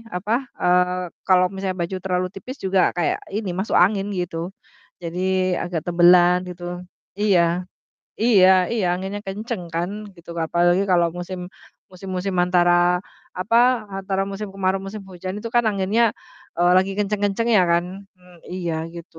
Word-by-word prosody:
apa, 200 +5 -1 0.3
eee, 180 0 +2 0.2
kalau 185 -1 +5
misalnya 190 -1 -3
baju 170 +3 -3
terlalu 185 0 0
tipis 255 +8 -8
juga 190 0 +3 0.2
kayak 175 - +1 0.2
ini 210 -1 -2
masuk 195 - -1
angin 200 -1 +1
gitu, 175 -2 -3 0.6
jadi 185 +1 0
agak 175 -2 -3
tebelan 175 +1 +6
gitu. 175 0 -9 0.6
Iya, 200 -4 +4 0.8
iya 205 -6 +6 0.2
iya 225 -4 0
anginnya 190 +3 -5
kenceng 210 +1 -4
kan 170 +2 -1 0.3
gitu. 170 0 -13 0.2
Apalagi 175 +3 +2
kalau 175 -2 +3
musim 180 0 -6 0.4
musim-musim 185 0 -4
antara 175 0 +3 0.3
apa, 195 +6 0 0.4
antara 195 0 -2
musim 200 +1 -5
kemarau, 190 -1 0
musim 195 +2 -7
hujan 185 0 -6
itu 230 - -5
kan 240 +1 +2
anginnya, 215 +2 +2 0.5
eee, 175 +1 +4
lagi 190 +1 +2
kenceng-kencengnya 210 +1 +1
kan. 170 0 +2 0.3
Mmm, 180 -1 -20
iya 170 -3 -3
gitu, 170 -1 -11
185 Hz, 140 wpm, -22 LUFS, 175-195 Hz, 0.8 s, tebelan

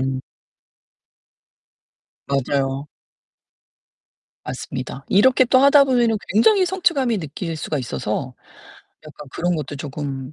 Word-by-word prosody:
음. 130 0 -2 2.1
맞아요. 135 0 -1 1.6
맞습니다. 130 +1 -6
이렇게 255 +6 +4
또 255 +1 +4
하다 280 +1 +6
보면은 240 -4 +2 0.2
굉장히 370 - +4
성취감이 285 - +1
느낄 160 +1 -5
수가 150 -1 -3
있어서 125 +1 -4 0.7
약간 150 -2 -12
그런 175 +5 -1
것도 145 -1 -5
조금 140 -1 -6
155 Hz, 225 characters per minute, -21 LUFS, -, 2.1 s, 하다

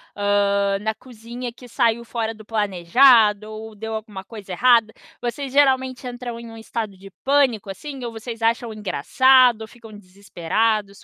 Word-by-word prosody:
hã, 200 -1 +1
na 220 +1 -2
cozinha 240 0 -8
que 245 +1 -15
saiu 235 -1 +1
fora 225 -1 -3
do 215 -1 -15
planejado 215 +2 +3
ou 220 0 -9
deu 220 +2 -6
alguma 210 -3 -6
coisa 205 -3 -11
errada? 230 +1 +4 0.3
Vocês 255 +3 -4
geralmente 260 -2 +2
entram 245 -1 -6
em 235 -1 -10
um 225 - -11
estado 220 -3 -5
de 195 0 -13
pânico, 265 -8 +2
assim, 270 +6 -7
ou 235 - -4
vocês 225 0 -8
acham 230 0 0
engraçado 235 - +3
ou 220 - -7
ficam 230 -2 -15
desesperados, 200 +2 -2
225 Hz, 160 wpm, -22 LUFS, 205-245 Hz, 0.3 s, errada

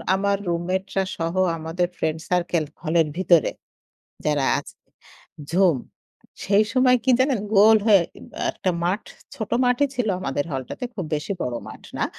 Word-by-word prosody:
আমার 200 +1 +1
রুমমেটরা 185 +3 -1
সহ 165 0 -2 0.2
আমাদের 165 +3 -1
ফ্রেন্ড 160 0 -1
সার্কেল, 175 -2 +1 0.2
হলের 165 -1 +2
ভিতরে 170 -4 +4 0.8
যারা 150 -2 +2
আছে, - - -10 0.8
ঝুম! 180 -6 +4 0.7
সেই 205 +2 +4
সময় 255 -1 +5
কী 260 - +3
জানেন? 260 -3 +2 0.2
গোল 220 +2 +8
হয়ে 200 -5 +6 0.2
ই - - -15
বা - - -10
একটা 185 - -1
মাঠ, 190 +5 0 0.3
ছোট 220 -2 -5
মাঠই 250 +3 +2
ছিল 245 -3 0
আমাদের 145 -2 -2
হলটাতে, 135 - -5
খুব 185 - -4
বেশি 150 +7 -4
বড় 125 -1 -2
মাঠ - - -11 0.2
না। - - +1
185 Hz, 155 wpm, -23 LUFS, 160-210 Hz, 0.8 s, গোল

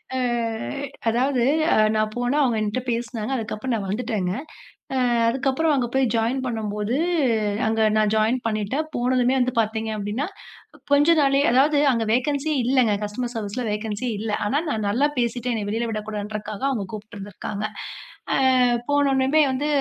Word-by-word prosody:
அ - - 0 0.9
அதாவது 250 +2 +1 0.3
அ - - +4 0.2
நான் 215 0 +1
போனா 245 +3 0
அவுங்க 245 -5 +2
என்ட்ட 215 +3 -1
பேசினாங்க. 230 0 -3
அதுக்கப்பறம் 225 +1 -3
நான் 200 -3 -3
வந்துட்டேங்க. 210 -4 -1 0.6
அ - - +1 0.3
அதுக்கப்பறம் 270 +6 +1
அங்க 250 -3 0
போய் 265 0 +3
ஜாயின் 235 +4 0
பண்ணும் 220 -4 -3
போது 210 +3 -1 0.7
அங்க 225 0 0 0.2
நான் 215 -1 +2
ஜாயின் 220 +4 +2
பண்ணிட்டேன். 220 +7 -1
போனதுமே 250 +1 +2
வந்து 250 0 +1
பார்த்தீங்கன்னா 220 +3 -3 0.7
கொஞ்சம் 305 +3 +5
நாள்லயே 275 0 +3
அதாவது 285 +4 +4 0.2
அங்க 230 -2 0
வேகன்ஸியே 285 +4 0
இல்லங்க 250 -4 +3
கஸ்டமர் 235 +4 -4
சர்வீஸ்ல 220 +3 -3
வேகன்ஸியே 215 +3 -3
இல்ல. 220 -1 -3
ஆனா, 260 +7 +1
நான் 215 -6 -1
நல்லா 255 +8 +2
பேசிட்டேன், 240 +1 -1
என்னைய 210 -2 -3
வெளில 230 +2 -1
விடக்கூடாதுன்றதுக்காக 210 0 -5
அவுங்க 225 -7 -2
கூப்பிட்டு 215 0 -9
இருந்திருக்காங்க. 200 +1 -5 0.7
அ, - - +2 0.5
போனவுடனமே 285 0 +3
வந்து 270 +3 -1
235 Hz, 145 wpm, -23 LUFS, 215-260 Hz, 0.9 s, கொஞ்சம்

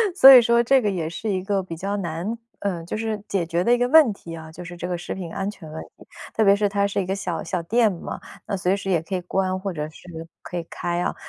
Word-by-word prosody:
所 270 -7 +10
以 250 - +10
说， 235 0 +3
这 265 +2 +4
个 210 - +1
也 175 -5 -2
是 215 +6 -5
一 185 -2 -1
个 195 0 0
比 180 -3 -7
较 195 +5 -3
难 180 +5 -3 0.2
呃， 180 -4 -3
就 175 - -4
是 220 -2 -3
解 190 -4 0
决 170 +1 0
的 235 - +2
一 - - +4
个 245 0 +1
问 305 -4 +7
题 170 -4 -9
啊， 160 -1 -10
就 175 +3 -9
是 175 0 -8
这 175 - -4
个 180 - -2
食 175 - -5
品 180 -3 -6
安 195 +3 -3
全 165 -7 -10
问 160 - -6 0.2
题。 - - -17 0.3
特 220 - +3
别 200 -1 +6
是 205 0 +1
它 200 0 +1
是 200 - -2
一 - - -3
个 190 +2 -2
小 180 -4 -3
小 180 -3 -2
店 225 +4 +3
嘛， 175 - -6 0.3
那 200 - -2
随 185 +1 +1
时 195 -1 -5
也 175 -4 +3
可 180 +4 -8
以 180 - -2
关， 185 +1 -1
或 195 +1 -3
者 150 -3 -4
是 165 +1 -10
可 180 - -6
以 170 - -3
开 175 0 -2
啊。 - - -1
190 Hz, 310 characters per minute, -23 LUFS, 175-205 Hz, 0.3 s, 所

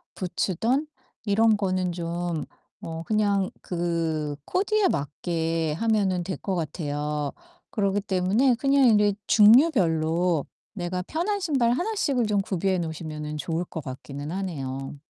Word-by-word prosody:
부츠든 220 - -1 0.4
이런 220 +1 +4
거는 185 -2 0
좀 170 -1 -3 0.4
어 165 0 -5
그냥 200 -2 +1
그 165 -4 -2
코디에 410 +2 +2
맞게 165 - -1
하면은 200 -5 +1
될 185 +2 -3
것 195 - -3
같아요. 150 -3 -2 0.4
그러기 205 -3 0
때문에 200 +7 +2
그냥 275 +2 +3
이제 210 -2 +4
종류별로 180 - +4 0.3
내가 180 -2 -3
편한 355 - -1
신발 270 -10 +2
1 360 - -1
씩을 275 - +1
좀 210 -2 +1
구비해 190 -1 0
놓으시면은 155 -2 -5
좋을 165 +3 -2
것 160 -3 -7
같기는 140 +3 -7
하네요. 140 -8 -4
185 Hz, 260 characters per minute, -25 LUFS, 160-220 Hz, 0.4 s, 이런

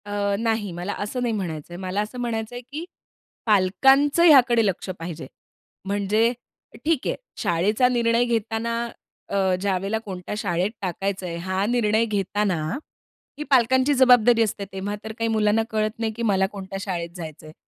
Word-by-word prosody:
अ, 205 -1 -1
नाही, 225 -3 -1
मला 175 +4 -4
असं 210 +5 -3
नाही 240 -2 0
म्हणायचं 175 -5 -4
आहे. - - -6
मला 190 +2 -1
असं 215 +4 -6
म्हणायचं 230 -1 -3
आहे, 245 - -5
की 285 +7 -7 0.6
पालकांचं 270 - +4
हयाकडे 245 -8 +6
लक्ष 190 -1 -2
पाहिजे. 165 -1 -6 0.6
म्हणजे 205 +4 +1 0.5
ठीक 315 -4 +1
आहे, - - 0 0.2
शाळेचा 205 +9 +2
निर्णय 235 -1 +2
घेताना 230 0 -1 0.5
अ, - - +1 0.2
ज्यावेळेला 195 +2 0
कोणत्या 185 -1 -6
शाळेत 185 -1 0
टाकायचं 190 +1 -3
आहे 170 -1 -4
हा 190 +2 -1
निर्णय 225 -1 +2
घेताना 205 -2 0 0.8
ही 300 - -4
पालकांची 260 +1 +4
जबाबदारी 245 -3 +5
असते. 205 -2 -3
तेव्हा 195 +2 -4
तर 220 - -5
काही 230 - 0
मुलांना 220 0 +2
कळत 215 -1 0
नाही 225 -1 -1
की 235 +2 -5
मला 195 -3 +3
कोणत्या 195 -1 -6
शाळेत 175 -4 -3
जायचं 160 -3 -8
आहे. 155 - -11
210 Hz, 160 wpm, -24 LUFS, 190-235 Hz, 0.8 s, हयाकडे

